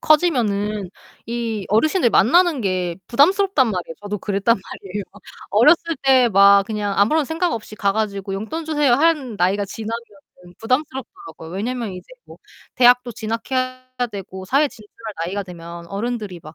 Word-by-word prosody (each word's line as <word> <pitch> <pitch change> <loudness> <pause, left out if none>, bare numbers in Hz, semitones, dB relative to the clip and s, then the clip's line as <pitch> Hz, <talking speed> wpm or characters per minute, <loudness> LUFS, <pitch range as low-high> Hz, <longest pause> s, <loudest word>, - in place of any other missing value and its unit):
커지면은 215 - +1 0.4
이 230 -3 -3
어르신들 255 - +2
만나는 330 - +4
게 185 -4 -1
부담스럽단 300 - +3
말이에요. 180 -4 -4
저도 205 0 -4
그랬단 200 +4 +1
말이에요. 195 +1 -7 0.5
어렸을 305 +8 +4
때 260 -3 +5
막 200 0 +6
그냥 210 -2 -3
아무런 285 +10 +3
생각 330 +4 -1
없이 215 -1 -6
가 200 -2 0
가지고 200 -2 -3
"용돈 270 +12 -5
주세요." 295 -4 +2
하는 285 -5 +1
나이가 195 +2 +1
지나면은 210 -4 -9
부담스럽더라고요. 250 - -4
왜냐면 225 +3 -3
이제 180 - -10 0.2
뭐 - - -14 0.4
대학도 245 -1 +4
진학해야 255 +4 -3 0.3
되고 190 -1 -7
사회 280 +8 +2
진출할 215 0 -11
나이가 200 +4 -3
되면 170 -2 -10
어른들이 205 -2 -4
막 155 +1 -12
220 Hz, 365 characters per minute, -20 LUFS, 195-255 Hz, 0.5 s, 막